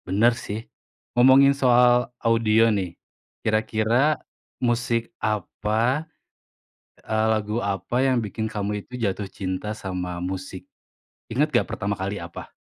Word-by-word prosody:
Bener, 105 Hz, +6 st, +4 dB
sih. 110 Hz, 0 st, -6 dB, 0.5 s
Ngomongin 130 Hz, +3 st, +6 dB
soal 125 Hz, -2 st, +4 dB
audio 115 Hz, -1 st, +3 dB
nih, 90 Hz, -4 st, -3 dB, 0.5 s
kira-kira 110 Hz, +6 st, +2 dB, 0.4 s
musik 120 Hz, -1 st, 0 dB
apa, 110 Hz, -, -1 dB, 0.9 s
eee, 110 Hz, 0 st, 0 dB
lagu 110 Hz, +1 st, -1 dB
apa 100 Hz, +6 st, -1 dB
yang 130 Hz, -2 st, +3 dB
bikin 110 Hz, 0 st, -3 dB
kamu 105 Hz, -1 st, -3 dB
itu 125 Hz, 0 st, -9 dB
jatuh 100 Hz, -2 st, -1 dB
cinta 95 Hz, +2 st, -4 dB
sama 90 Hz, -4 st, -4 dB
musik? 95 Hz, +1 st, -5 dB, 0.6 s
Ingat 140 Hz, +7 st, +2 dB
nggak 120 Hz, -, +3 dB
pertama 100 Hz, 0 st, -2 dB
kali 100 Hz, +1 st, -3 dB
apa? 85 Hz, 0 st, -9 dB
110 Hz, 120 wpm, -24 LUFS, 100-120 Hz, 0.9 s, Ngomongin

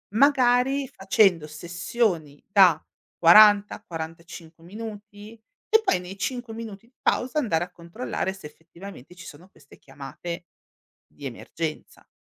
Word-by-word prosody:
Magari, 265 Hz, +1 st, +3 dB
facendo 190 Hz, -6 st, +2 dB
sessioni 170 Hz, -1 st, -3 dB
da 190 Hz, -6 st, +5 dB, 0.4 s
40-45 170 Hz, -4 st, +3 dB
minuti 210 Hz, +2 st, -10 dB, 0.4 s
e 440 Hz, 0 st, +5 dB
poi 380 Hz, -, +1 dB
nei 180 Hz, +2 st, -9 dB
5 245 Hz, +2 st, -4 dB
minuti 225 Hz, -1 st, -9 dB
di 250 Hz, -, -32 dB
pausa 260 Hz, +4 st, 0 dB
andare 175 Hz, -, 0 dB
a 180 Hz, -, -20 dB
controllare 185 Hz, +3 st, -5 dB
se 190 Hz, -5 st, -10 dB
effettivamente 170 Hz, 0 st, -13 dB
ci 180 Hz, -, -12 dB
sono 170 Hz, +6 st, -13 dB
queste 140 Hz, -5 st, -20 dB
chiamate 145 Hz, +6 st, -9 dB, 0.6 s
di -, -, -14 dB
emergenza. -, -, -6 dB
190 Hz, 120 wpm, -25 LUFS, 165-225 Hz, 0.6 s, da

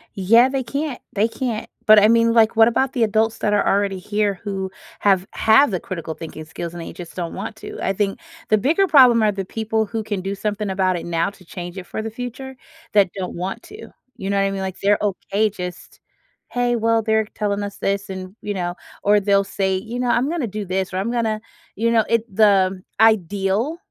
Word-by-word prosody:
Yeah, 230 Hz, +7 st, +5 dB
they 270 Hz, -1 st, -2 dB
can't 280 Hz, +2 st, -4 dB
they 210 Hz, +2 st, +2 dB
can't. 230 Hz, -2 st, -4 dB, 0.2 s
But 215 Hz, -2 st, +8 dB
I 210 Hz, -, +5 dB
mean, 230 Hz, 0 st, +4 dB
like, 225 Hz, -1 st, +4 dB
what 225 Hz, 0 st, +7 dB
about 260 Hz, +3 st, +1 dB
the 245 Hz, -5 st, +1 dB
adults 220 Hz, +1 st, +1 dB
that 210 Hz, -, 0 dB
are 205 Hz, -, +2 dB
already 200 Hz, -1 st, +1 dB
here 205 Hz, 0 st, -1 dB
who 195 Hz, -2 st, -3 dB, 0.3 s
have 190 Hz, -2 st, +3 dB
have 225 Hz, +5 st, +4 dB
the 185 Hz, -, -1 dB
critical 165 Hz, -3 st, -6 dB
thinking 155 Hz, -1 st, -8 dB
skills 165 Hz, +2 st, -6 dB
and 175 Hz, -, -7 dB
they -, -, -8 dB
just 175 Hz, -2 st, -10 dB
don't 175 Hz, -2 st, -4 dB
want -, -, -6 dB
to? -, -, -9 dB
I 195 Hz, -, 0 dB
think, 195 Hz, 0 st, -1 dB, 0.3 s
the 215 Hz, -, +5 dB
bigger 325 Hz, -, +2 dB
problem 250 Hz, -8 st, +6 dB
are 210 Hz, -, +3 dB
the 195 Hz, -1 st, -4 dB
people 220 Hz, +2 st, -1 dB
who 220 Hz, +1 st, -4 dB
can 205 Hz, -3 st, -3 dB
do 195 Hz, +2 st, -3 dB
something 210 Hz, 0 st, -3 dB
about 190 Hz, -1 st, +1 dB
it -, -, -7 dB
now 165 Hz, -1 st, 0 dB
to 195 Hz, -2 st, -19 dB
change 175 Hz, +2 st, -8 dB
it 185 Hz, -, -6 dB
for -, -, -4 dB
the 225 Hz, 0 st, -5 dB
future, 250 Hz, +3 st, -7 dB, 0.4 s
that 200 Hz, -4 st, +4 dB
don't 185 Hz, -2 st, -5 dB
want 185 Hz, +2 st, -4 dB
to. 420 Hz, +2 st, -11 dB, 0.3 s
You 195 Hz, -, -4 dB
know 200 Hz, -, +1 dB
what 195 Hz, -, +3 dB
I -, -, -2 dB
mean? 195 Hz, 0 st, -4 dB
Like, 190 Hz, -1 st, -5 dB
they're 205 Hz, +1 st, +3 dB
okay, 205 Hz, +1 st, 0 dB
just, 180 Hz, -3 st, -8 dB, 0.5 s
"Hey, 245 Hz, 0 st, 0 dB
well, 230 Hz, 0 st, +2 dB
they're 220 Hz, 0 st, +1 dB
telling 205 Hz, -1 st, -2 dB
us 200 Hz, 0 st, -6 dB
this," 200 Hz, 0 st, -2 dB
and, 185 Hz, 0 st, -7 dB
you 205 Hz, -, -3 dB
know, 175 Hz, -2 st, -3 dB, 0.3 s
or 205 Hz, +1 st, +4 dB
they'll 200 Hz, 0 st, +3 dB
say, 195 Hz, -1 st, -1 dB
you 225 Hz, +6 st, -6 dB
know, 250 Hz, -1 st, 0 dB
"I'm 250 Hz, +4 st, +2 dB
gonna 325 Hz, -7 st, -2 dB
do 210 Hz, 0 st, -5 dB
this 190 Hz, 0 st, -2 dB
or -, -, -2 dB
I'm 200 Hz, +5 st, -1 dB
gonna," 225 Hz, -3 st, -1 dB, 0.3 s
you 230 Hz, +3 st, +1 dB
know, 225 Hz, -1 st, +4 dB
it 230 Hz, -1 st, +2 dB
the 190 Hz, -3 st, +3 dB, 0.2 s
ideal 215 Hz, -, +2 dB
205 Hz, 225 wpm, -21 LUFS, 190-225 Hz, 0.5 s, But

